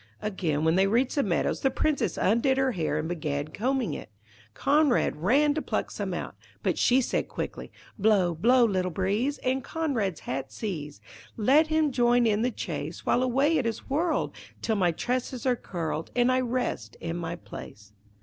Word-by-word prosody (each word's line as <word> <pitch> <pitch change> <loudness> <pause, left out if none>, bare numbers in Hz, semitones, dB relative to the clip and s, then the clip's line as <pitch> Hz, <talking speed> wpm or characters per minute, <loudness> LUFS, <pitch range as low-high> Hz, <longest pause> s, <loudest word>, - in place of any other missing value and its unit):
Again, 170 -8 -1
when 160 +2 +3
they 195 +1 +4
reached 240 +5 +2
the 285 - +2
meadows, 185 -9 0
the 270 - +3
Princess 300 +2 0
undid 235 +6 +2
her 265 -1 +2
hair 160 -7 -1
and 155 +1 -2
began 150 -3 -3
combing 255 - -1
it. - - -7 0.5
Conrad 290 -3 +3
ran 275 - +3
to 310 - -2
pluck - - -2
some - - -4
out; - - -4 0.3
but - - 0
she 255 +2 +4
said - - -1
quickly - - -6 0.3
'Blow, 195 -4 +3
blow, 240 +9 +4
little 185 -4 0
breeze, 205 - 0
And 260 +1 0
Conrad's 235 - -2
hat 135 +1 -4
seize. 150 - -5 0.4
Let 275 +8 +4
him 310 -2 +2
join 240 -1 +3
in 215 -1 +2
the 245 - +2
chase - - -5
While 245 - +3
away 270 +5 +2
it 245 - 0
is 230 +3 -5
whirled, 320 +3 0 0.3
Till 220 - +1
my 180 -4 +2
tresses 250 +7 -3
are 255 -1 +3
curled 165 -7 -4
And 245 +1 +4
I 255 - +3
rest 250 0 -2
in 165 0 -4
my 170 - -4
place.' 100 +12 -11
230 Hz, 180 wpm, -27 LUFS, 175-265 Hz, 0.5 s, they